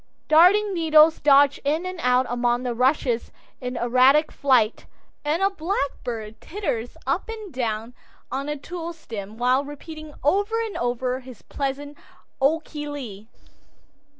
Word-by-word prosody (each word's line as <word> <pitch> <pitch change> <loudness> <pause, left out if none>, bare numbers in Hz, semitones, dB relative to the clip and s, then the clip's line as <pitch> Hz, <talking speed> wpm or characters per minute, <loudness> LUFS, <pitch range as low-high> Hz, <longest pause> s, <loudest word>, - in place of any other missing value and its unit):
Darning 380 +6 +5
needles 320 -2 +5
dodge 285 -1 +5
in 310 +5 0
and 370 -1 -5
out 250 +1 +3
among 240 0 0
the 245 -1 -2
rushes 250 -1 +1 0.3
in 250 -1 -4
erratic 255 +6 +4
flight, 250 -6 +2 0.4
and 310 +5 0
a 390 - +4
blackbird 260 - -4
teeters 290 - -4
up - - -1
and 430 -6 -7
down 230 -2 -3 0.4
on 275 +2 -3
a 295 - -2
tulle 340 +3 -6
stem 220 -9 -8
while 250 +3 +2
repeating 305 +1 -10
over 405 +9 +1
and 435 - -7
over 250 +1 -1
his 255 -3 -13
pleasant 285 +1 -4 0.5
"O 315 +4 +3
ko 305 -1 -10
lee." 260 -9 -6
280 Hz, 140 wpm, -24 LUFS, 245-320 Hz, 0.5 s, Darning